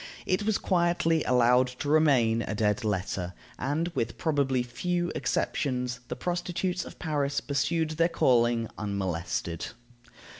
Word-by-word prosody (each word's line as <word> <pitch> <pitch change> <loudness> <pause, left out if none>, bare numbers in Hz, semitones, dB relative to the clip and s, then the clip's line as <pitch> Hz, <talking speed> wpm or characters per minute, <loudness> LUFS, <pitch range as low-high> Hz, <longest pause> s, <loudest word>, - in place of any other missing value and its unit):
It 185 +2 +1
was 220 - +3
quietly 170 -3 +2
allowed 125 0 +4
to 145 - -4
remain 135 -7 +4
a 110 - -3
dead 105 +3 +1
letter, 95 -3 -2 0.3
and, 150 +6 -1
with 120 -9 -3
probably 140 -5 +1
few 175 +8 -2
exceptions, 125 -3 -1
the - - -4
prostitutes 180 +1 -2
of - - -11
Paris 145 -4 -1
pursued 160 +3 0
their 165 +2 +2
calling 120 -5 +3
unmolested. 90 -4 -2
135 Hz, 125 wpm, -28 LUFS, 115-165 Hz, 0.3 s, allowed